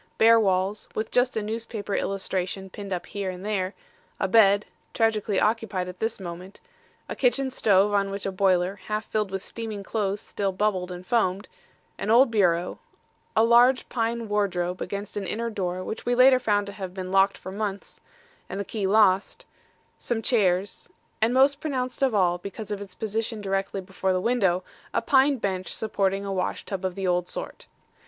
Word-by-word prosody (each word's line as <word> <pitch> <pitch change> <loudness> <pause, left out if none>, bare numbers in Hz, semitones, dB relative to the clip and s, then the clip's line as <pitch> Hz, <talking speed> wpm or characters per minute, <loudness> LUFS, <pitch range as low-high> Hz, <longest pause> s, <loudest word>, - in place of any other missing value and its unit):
Bare 230 +1 +7
walls, 195 0 0
with 215 0 -3
just 250 -1 +2
a 215 - -1
newspaper 220 -1 -4
illustration 190 -1 -2
pinned 200 0 -8
up 180 -2 -2
here 200 -2 -4
and 185 +1 -7
there, 195 -2 -1 0.4
a 190 - +1
bed 205 0 +5 0.3
tragically 215 -3 +1
occupied 210 -4 0
at 180 0 -9
this 225 0 -2
moment 180 +1 -8 0.5
a - - -5
kitchen 265 +1 +1
stove 205 -4 +3
on 200 -1 +2
which 195 0 -5
a 195 - -1
boiler, 185 0 +2
half 215 0 -2
filled 215 -2 -1
with 195 0 -4
steaming 220 -3 -5
clothes 205 -1 -1
still 200 -1 -2
bubbled 185 -2 -1
and 180 0 -8
foamed, 200 -4 +1 0.5
an - - -3
old 240 +2 +6
bureau, 180 -5 +1 0.6
a 220 - +5
large 240 +3 +5
pine 230 -1 -1
wardrobe 185 -4 -1
against 200 +1 -5
an 195 -2 -3
inner 230 +2 -2
door 185 -3 -3
which 215 - -5
we 245 - +1
later 255 +1 +7
found 205 -4 +1
to 200 - -8
have 190 -2 -7
been 185 -1 -5
locked 195 +1 +4
for 185 - -8
months, 200 0 -5 0.5
and 195 - -4
the 200 - -3
key 205 -2 -2
lost, 200 -1 +3 0.5
some 225 -2 -2
chairs 195 -5 +1 0.3
and 225 +2 +3
most 275 +3 +4
pronounced 260 -3 -3
of 260 -5 +2
all, 175 -3 +2
because 200 +3 -7
of 205 -1 -3
its 190 -2 -9
position 220 +2 -2
directly 195 -1 -2
before 190 0 -2
the 185 - +1
window, 190 -5 +1 0.3
a - - +3
pine 275 0 +4
bench 190 -4 -3
supporting 200 -2 -1
a 195 - -2
wash 185 -1 -2
tub 195 -2 -4
of 185 -1 -2
the 195 - -3
old 180 -1 +1
sort. - - -7
200 Hz, 185 wpm, -26 LUFS, 190-225 Hz, 0.6 s, Bare